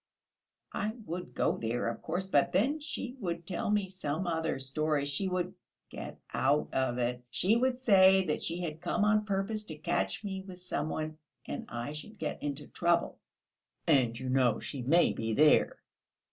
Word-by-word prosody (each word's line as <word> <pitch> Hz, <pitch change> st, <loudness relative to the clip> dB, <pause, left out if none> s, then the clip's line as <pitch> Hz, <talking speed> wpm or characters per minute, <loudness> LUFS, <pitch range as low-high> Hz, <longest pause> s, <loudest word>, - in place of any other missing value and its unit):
"I 215 Hz, +1 st, -1 dB
would 180 Hz, 0 st, -6 dB
go -, -, +1 dB
there, 115 Hz, +2 st, -1 dB
of 115 Hz, -, -3 dB
course, 175 Hz, +4 st, -2 dB
but 145 Hz, -7 st, +2 dB
then 265 Hz, -, +2 dB
she 265 Hz, -4 st, -5 dB
would 170 Hz, -5 st, -3 dB
tell 180 Hz, +2 st, -2 dB
me 205 Hz, -2 st, +2 dB
some 185 Hz, -2 st, -3 dB
other 165 Hz, -2 st, 0 dB
story; 145 Hz, +2 st, 0 dB
she 145 Hz, +7 st, -1 dB
would... 180 Hz, 0 st, -1 dB, 0.4 s
get -, -, -7 dB
out 140 Hz, +3 st, +2 dB
of 130 Hz, -2 st, +1 dB
it. 125 Hz, 0 st, -1 dB
She 195 Hz, -, +2 dB
would 250 Hz, +1 st, +2 dB
say 190 Hz, -6 st, +6 dB
that 150 Hz, -, -1 dB
she 170 Hz, +2 st, -2 dB
had 160 Hz, -2 st, -4 dB
come 205 Hz, +4 st, +1 dB
on 210 Hz, 0 st, +3 dB
purpose 200 Hz, +2 st, -1 dB
to 160 Hz, -, -7 dB
catch 95 Hz, -9 st, -1 dB
me 190 Hz, -2 st, -3 dB
with 185 Hz, -2 st, -10 dB
some 155 Hz, -4 st, -3 dB
one, 155 Hz, 0 st, -4 dB, 0.3 s
and -, -, -5 dB
I 120 Hz, +5 st, -4 dB
should 210 Hz, +8 st, -8 dB
get 155 Hz, -5 st, -4 dB
into 145 Hz, 0 st, -3 dB
trouble." 170 Hz, +2 st, +1 dB, 0.7 s
"And, 120 Hz, -4 st, +3 dB
you 130 Hz, -1 st, -3 dB
know, 125 Hz, -4 st, +3 dB
she 140 Hz, -, -4 dB
may 165 Hz, +8 st, +4 dB
be 110 Hz, 0 st, -2 dB
there! 150 Hz, +1 st, +5 dB
170 Hz, 180 wpm, -31 LUFS, 140-190 Hz, 0.7 s, say